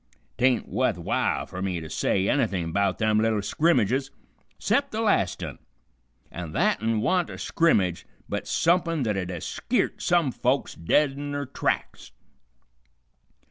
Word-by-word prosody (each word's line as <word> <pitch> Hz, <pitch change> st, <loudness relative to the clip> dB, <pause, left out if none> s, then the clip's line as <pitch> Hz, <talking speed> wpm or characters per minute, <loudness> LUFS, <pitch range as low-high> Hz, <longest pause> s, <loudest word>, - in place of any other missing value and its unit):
'Tain't 125 Hz, -1 st, +2 dB
wuth 125 Hz, -5 st, 0 dB
w'ile 85 Hz, -, -1 dB
fer 90 Hz, -, -7 dB
me 95 Hz, -3 st, -1 dB
to 80 Hz, -, -7 dB
say 95 Hz, +5 st, 0 dB
anything 95 Hz, -, 0 dB
'bout 100 Hz, +1 st, +1 dB
them 110 Hz, -1 st, +2 dB
little 110 Hz, -1 st, +2 dB
skrimmages 135 Hz, -, +2 dB, 0.5 s
'cept 280 Hz, 0 st, +1 dB
the 215 Hz, -, -3 dB
last 205 Hz, -, +1 dB
un, -, -, -6 dB, 0.7 s
an' 85 Hz, -3 st, -6 dB
that -, -, +1 dB
un 110 Hz, -1 st, 0 dB
wa'n't 180 Hz, +5 st, +1 dB
a -, -, -7 dB
skrimmage 95 Hz, -, +1 dB, 0.2 s
but -, -, -4 dB
sumpin' 165 Hz, -3 st, +2 dB
that'd 95 Hz, -5 st, -1 dB
'a' 90 Hz, -2 st, -4 dB
skeert -, -, -1 dB
some 170 Hz, -6 st, +2 dB
folks 125 Hz, +3 st, 0 dB
dead 135 Hz, -, +2 dB
in 145 Hz, +1 st, -6 dB
their 145 Hz, 0 st, -2 dB
tracks. 130 Hz, -, -3 dB
115 Hz, 145 wpm, -26 LUFS, 95-145 Hz, 0.7 s, Tain't